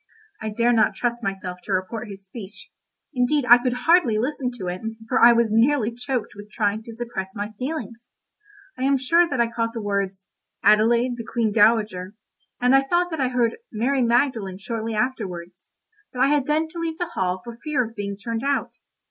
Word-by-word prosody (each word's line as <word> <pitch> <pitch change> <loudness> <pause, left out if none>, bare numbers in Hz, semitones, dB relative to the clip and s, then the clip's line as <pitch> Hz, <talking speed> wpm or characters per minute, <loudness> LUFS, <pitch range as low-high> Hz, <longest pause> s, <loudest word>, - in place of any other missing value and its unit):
I 220 - -3
dare 235 +3 +2
not 220 -3 +3
trust 240 -1 -1
myself 190 -3 -4
to - - -4
report 215 +5 -2
his 195 -1 -10
speech—indeed 245 +6 -4
I 240 +1 +9
could 250 0 -2
hardly 325 -10 +4
listen 255 +2 -1
to 190 - -6
it, 180 +1 -4 0.3
for - - +2
I 240 - +10
was 235 -2 +2
nearly 235 0 +3
choked 245 0 -3
with 205 0 -11
trying 210 -1 -1
to 230 +1 -10
suppress 225 -5 -5
my 205 +1 -4
feelings. 250 -5 -4 0.8
I - - -5
am 275 +1 +3
sure 335 +6 +3
that 255 - -2
I 235 - +4
caught 230 0 -2
the - - -2
words 195 -1 -2 0.4
"Adelaide, 235 +4 +4
the 230 - -5
Queen 225 -1 -1
Dowager," 210 -3 +2 0.4
and 250 +2 +4
I 270 - +6
thought 345 +6 0
that 320 -3 -2
I 260 - +2
heard 245 -2 0
"Mary 255 +5 0
Magdalene" 235 -5 +1
shortly 225 +2 -4
afterwards, 185 -7 -4 0.4
but 250 - -8
I 265 +2 +4
had 290 -2 +1
then 310 +2 +1
to 340 +1 -8
leave 325 -1 -3
the 350 -1 -3
hall 185 0 -1
for 235 -1 -9
fear 290 -5 0
of 225 - -15
being 200 -2 -4
turned 225 +2 -4
out. 280 0 -1
235 Hz, 195 wpm, -23 LUFS, 210-260 Hz, 0.8 s, I